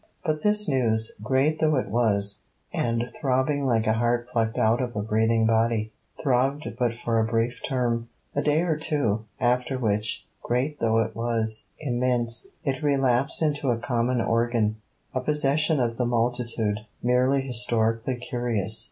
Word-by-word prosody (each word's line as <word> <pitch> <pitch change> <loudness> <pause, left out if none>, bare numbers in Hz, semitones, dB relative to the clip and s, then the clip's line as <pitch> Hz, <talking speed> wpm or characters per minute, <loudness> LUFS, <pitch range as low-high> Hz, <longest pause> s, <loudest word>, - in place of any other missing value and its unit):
But 155 -2 0
this 210 -1 +2
news, 110 -5 +1
great 135 +7 +1
though 155 -1 +3
it 130 - 0
was, 100 -3 +2 0.3
and 120 +1 -1
throbbing 140 +1 +1
like 115 -3 +2
a 110 - +3
heart 120 +1 0
plucked 115 -2 -1
out 115 +3 +3
of 120 -3 -4
a 105 - -1
breathing 110 +1 +2
body, 110 -1 +1 0.3
throbbed 135 +2 +1
but 120 -2 +1
for 115 -1 +2
a - - +3
brief 115 +2 -1
term, 120 -3 -1 0.3
a 145 - +1
day 150 +2 +2
or 165 -3 +1
two; 140 -9 -1
after 125 +2 +1
which, 105 -3 -1 0.2
great 135 +5 -1
though 115 -1 +2
it 110 0 -7
was, 115 -2 0
immense, 120 -4 0 0.2
it 135 +2 -2
relapsed 135 0 +1
into 145 -3 0
a 120 - +2
common 120 +1 0
organ, 115 -2 +1 0.4
a 130 - -1
possession 150 +2 +1
of 115 -2 -1
the 125 - 0
multitude, 115 -3 0 0.2
merely 125 +3 +3
historically 120 -1 +1
curious. 120 -4 0
120 Hz, 155 wpm, -25 LUFS, 115-135 Hz, 0.4 s, though